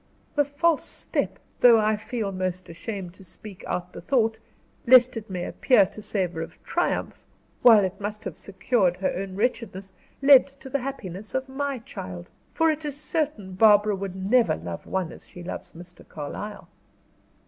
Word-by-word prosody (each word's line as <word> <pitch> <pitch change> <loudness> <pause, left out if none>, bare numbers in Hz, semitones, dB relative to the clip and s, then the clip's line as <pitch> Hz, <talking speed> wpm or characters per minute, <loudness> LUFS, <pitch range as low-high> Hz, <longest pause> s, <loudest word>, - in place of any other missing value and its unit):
The 290 -1 +3
false 300 +3 +1
step - - -3 0.2
though 240 -2 +8
I 215 0 +2
feel 220 +1 -4
almost 185 -1 -3
ashamed 180 +1 -6
to 195 - -15
speak 195 +1 -11
out 180 0 -3
the - - -8
thought, 225 -4 +1 0.5
lest 255 0 +7
it 225 -2 -6
may 180 -2 -3
appear 250 -7 +4
to 215 - -10
savor 180 -6 -2
of 165 - -8
triumph - - -2 0.4
while 225 -4 +8
it 190 +2 -5
must 210 +1 -4
have - - -5
secured 190 -2 0
her 190 - -1
own 190 0 -5
wretchedness, 205 -4 -2 0.3
led 275 -1 +7
to 275 -1 -13
the 280 - +1
happiness 215 -7 -6
of 260 0 -1
my 275 0 -3
child; 90 - -8 0.2
for 325 0 +3
it 310 0 -4
is 290 -1 -4
certain 295 - -2
Barbara 210 +1 +5
would 195 -1 -5
never 215 +6 +3
love 85 +1 -7
one 185 -3 -2
as - - -13
she 175 - -11
loves 175 - -7
Mr. 175 +1 -13
Carlyle." 205 +8 -7
210 Hz, 170 wpm, -25 LUFS, 185-255 Hz, 0.5 s, though